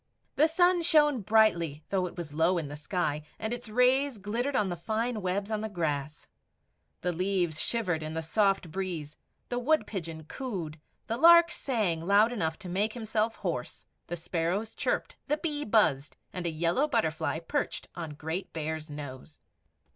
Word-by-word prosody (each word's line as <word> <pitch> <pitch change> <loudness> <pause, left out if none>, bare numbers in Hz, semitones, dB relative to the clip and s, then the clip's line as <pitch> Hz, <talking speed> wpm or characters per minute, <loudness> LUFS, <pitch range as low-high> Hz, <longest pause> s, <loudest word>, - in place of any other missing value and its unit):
The 310 - +5
sun 355 +2 +4
shone 295 -6 +4
brightly 170 -8 +3
though 185 -2 +1
it 180 - -11
was 160 -4 -6
low 165 +4 +3
in 155 -4 -3
the 145 - -6
sky, 150 -1 -1 0.2
and 220 +1 -3
its 245 -2 -6
rays 250 +3 +3
glittered 235 +7 -2
on 205 -5 +2
the 175 - -2
fine 220 +5 -2
webs 195 +3 -2
on 215 -1 -1
the 220 - -3
grass. 150 -6 -3 0.8
The 180 - 0
leaves 180 -3 0
shivered 185 -9 0
in 155 +1 -5
the 160 - -2
soft 195 0 +1
breeze; 170 -5 -4 0.3
the 245 - -1
wood 310 +5 +2
pigeon 165 -5 -5
cooed; 170 - -5 0.3
the 230 - -2
lark 340 +3 +8
sang 215 - -1
loud 205 +6 +4
enough 160 -8 -1
to - - -4
make 200 +5 0
himself 220 -1 -1
hoarse; - - -4 0.2
the 175 - -3
sparrows 175 +6 -2
chirped; - - -2
the 300 - +1
bee 300 -2 -2
buzzed, 160 - +2 0.2
and 180 -2 -3
a - - 0
yellow 170 - +1
butterfly 160 - 0
perched 165 - -3
on 160 -4 -6
great 160 +5 -4
Bear's 155 0 -4
nose. 145 0 -8
190 Hz, 170 wpm, -29 LUFS, 160-230 Hz, 0.8 s, lark